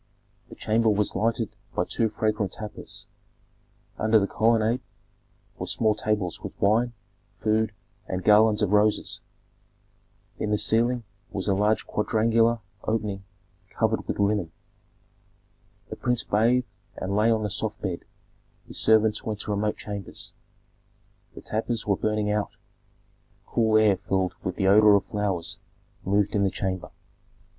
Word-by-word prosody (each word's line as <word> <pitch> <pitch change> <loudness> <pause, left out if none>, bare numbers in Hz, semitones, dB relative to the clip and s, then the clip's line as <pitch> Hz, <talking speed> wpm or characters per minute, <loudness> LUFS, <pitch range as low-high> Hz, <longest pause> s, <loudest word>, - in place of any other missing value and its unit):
The - - -10
chamber 110 +1 +1
was 105 -1 +1
lighted 115 -1 -1 0.2
by - - +1
two 115 - 0
fragrant 105 -2 -1
tapers; 105 0 -6 0.9
under 110 +1 +4
the 100 - +3
colonnade 115 +3 +2 0.8
were - - -4
small 110 -2 +2
tables 105 -4 -1
with - - -8
wine, 115 +4 +2 0.5
food, 110 0 +1 0.4
and 95 0 -3
garlands 105 0 +5
of 100 - +1
roses. 105 0 +2 1.2
In 105 - -1
the 105 - +2
ceiling 120 +3 +1 0.3
was 95 0 -3
a 100 - +3
large 105 +3 +1
quadrangular 115 +2 +2 0.2
opening 105 -3 -2 0.5
covered 110 -1 -1
with - - -2
linen. 100 -4 +1 1.4
The - - -5
prince 125 -1 +1
bathed 120 +4 +2 0.3
and 95 +1 -2
lay 110 +2 +3
on 110 -1 +2
the 105 - -2
soft 105 +1 -2
bed; 90 -4 -3 0.7
his - - -3
servants 110 -1 +3
went 110 -4 -3
to - - -4
remote 105 +1 0
chambers. 100 -2 -7 1.0
The - - -9
tapers 110 +1 -2
were 100 - +2
burning 105 +1 0
out; 105 0 0 1.0
cool 110 -2 +2
air 105 -3 +4
filled 95 -1 -1
with 90 - -3
the 95 - -1
odor 105 +1 +7
of 100 - +1
flowers 100 -5 -3 0.4
moved 100 +1 +1
in 100 - +2
the 100 - +3
chamber. 95 -1 -3
105 Hz, 140 wpm, -26 LUFS, 100-110 Hz, 1.4 s, odor